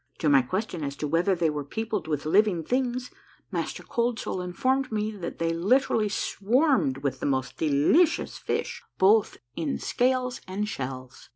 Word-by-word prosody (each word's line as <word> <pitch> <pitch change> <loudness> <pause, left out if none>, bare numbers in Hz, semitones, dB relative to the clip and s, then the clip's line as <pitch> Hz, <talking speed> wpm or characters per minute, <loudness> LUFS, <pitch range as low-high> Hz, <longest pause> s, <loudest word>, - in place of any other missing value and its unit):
To 155 - +1
my 140 -2 +6
question 180 - -3
as 140 -1 -3
to 150 - -3
whether 170 +6 +2
they 165 -3 +1
were 150 -1 -3
peopled 220 +2 -3
with 150 -2 -2
living 185 0 +3
things. 250 +4 -1 0.4
Master - - -3
Cold 235 0 -1
Soul 185 - -3
informed 255 +10 0
me 215 0 -1
that 185 -5 -6
they 165 0 0
literally 210 +4 +2
swarmed 210 - +1
with 135 -2 -1
the - - -2
most 130 -2 -1
delicious 160 - +2
fish, - - -3 0.2
both 210 +3 +4 0.2
ill 155 -4 -2
scales 255 0 0
and 200 +3 -2
shells. 130 - -6
185 Hz, 165 wpm, -26 LUFS, 150-235 Hz, 0.4 s, my